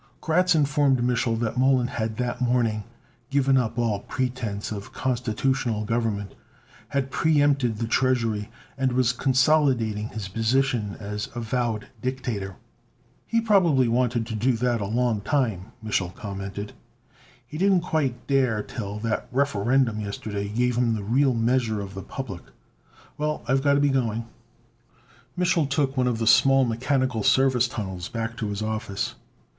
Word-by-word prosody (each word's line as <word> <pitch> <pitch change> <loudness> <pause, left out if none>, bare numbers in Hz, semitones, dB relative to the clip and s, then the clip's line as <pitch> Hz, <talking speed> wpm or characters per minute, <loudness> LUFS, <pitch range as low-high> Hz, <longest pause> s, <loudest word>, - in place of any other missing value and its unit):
Kratz 180 +2 +2
informed 145 -3 +3
Mich'l 120 -1 +1
that 120 +2 -1
Mollon 130 -1 +4
had 110 -2 -3
that 125 0 -2
morning 120 -4 +1 0.4
given 135 -1 +3
up 120 -2 0
all 115 -4 +1
pretense 120 -4 -3
of 105 -1 -6
constitutional 120 -2 -1
government, 110 -3 -1 0.5
had 135 -1 -2
preempted 145 -7 +2
the 115 - -2
treasury, 115 -3 +1 0.3
and 130 -1 +1
was 125 -1 +2
consolidating 130 -5 +2
his 110 -4 -6
position 115 0 0
as 105 0 -4
avowed 115 -2 -2
dictator. 120 -7 -3 0.7
"He 230 - +2
probably 175 - +4
wanted 120 -1 +1
to 110 - -6
do 120 +4 +1
that 120 -1 0
a 100 - -2
long 115 -1 0
time," 115 - -1
Mich'l 95 -5 -1
commented. 100 0 -6 0.7
"He 155 - -8
didn't 190 -1 +4
quite 135 -8 -1
dare 125 -6 +1
till 105 -2 -6
that 115 -1 -2
Referendum 125 -3 +1
yesterday 100 0 -4
gave 120 +2 0
him 115 -2 +2
the 105 - -4
real 130 +5 +2
measure 115 -1 +1
of 100 -1 -6
the 95 - -6
public. 100 -6 -6 0.8
Well, 150 0 -1
I've 135 +2 +2
got 140 0 +3
to - - +3
be 145 0 +3
going." 115 -4 0 1.1
Mich'l 180 -4 +2
took 140 -1 0
one 130 -2 +2
of 120 -2 0
the 115 - -1
small 135 +4 +5
mechanical 125 0 0
service 130 +2 +3
tunnels 95 -6 -5
back 115 0 -4
to 110 - -2
his 105 +1 -3
office. 110 -2 -3
120 Hz, 150 wpm, -25 LUFS, 110-135 Hz, 1.1 s, small